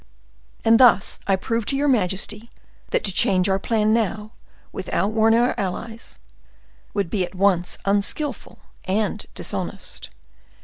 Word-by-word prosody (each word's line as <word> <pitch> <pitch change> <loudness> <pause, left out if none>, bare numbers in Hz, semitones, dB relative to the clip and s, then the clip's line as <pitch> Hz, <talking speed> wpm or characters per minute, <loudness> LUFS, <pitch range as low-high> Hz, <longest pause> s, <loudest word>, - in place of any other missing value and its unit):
And 225 0 +6
thus 240 -7 +5
I 195 - +4
prove 230 +4 -2
to - - +1
your 285 +2 +1
majesty 215 -1 0 0.4
that - - 0
to 200 - +3
change 185 0 +3
our 190 0 +1
plan 215 +1 +1
now, 215 -1 -1 0.4
without 200 - -2
warning 225 +1 +4
our 245 +1 +2
allies, 220 +4 -5 0.8
would 200 -3 0
be 195 -4 0
at 180 +2 -7
once 185 -2 +1
unskillful 205 +9 -2 0.3
and 205 +3 -1
dishonest. - - -5
210 Hz, 135 wpm, -22 LUFS, 195-230 Hz, 0.8 s, And